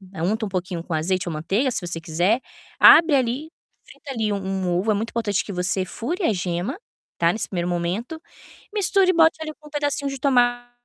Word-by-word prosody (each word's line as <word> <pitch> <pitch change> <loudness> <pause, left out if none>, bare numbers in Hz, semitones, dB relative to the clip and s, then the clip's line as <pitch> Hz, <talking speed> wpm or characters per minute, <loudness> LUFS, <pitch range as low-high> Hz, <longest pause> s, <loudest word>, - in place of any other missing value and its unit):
unta 210 +7 -1
um - - -8
pouquinho 180 -2 -4
com 170 - -5
azeite 180 +3 -1
ou - - -4
manteiga, 195 - 0
se 200 -7 -3
você 170 -1 -4
quiser, 175 +10 +1 0.4
abre 325 -3 +8
ali, 265 +5 -1 0.3
frita 280 - -11
ali 220 -5 -1
um - - -1
um 190 -2 -2
ovo, 215 +4 -2
é - - +3
muito 225 +3 -3
importante 210 -4 -1
que 200 - -6
você 180 +1 -1
fure 335 - -4
a 225 - +2
gema, 180 - -3 0.4
tá, 170 0 +4
nesse 220 +1 -3
primeiro 175 -2 -3
momento, 180 - -3 0.5
misture 390 -2 +3
e - - -3
bote 325 0 +4
ali 310 - -4
um 300 - -12
pedacinho 290 -1 -1
de 275 - -5
tomate, 245 -2 +2
215 Hz, 205 wpm, -23 LUFS, 180-275 Hz, 0.5 s, abre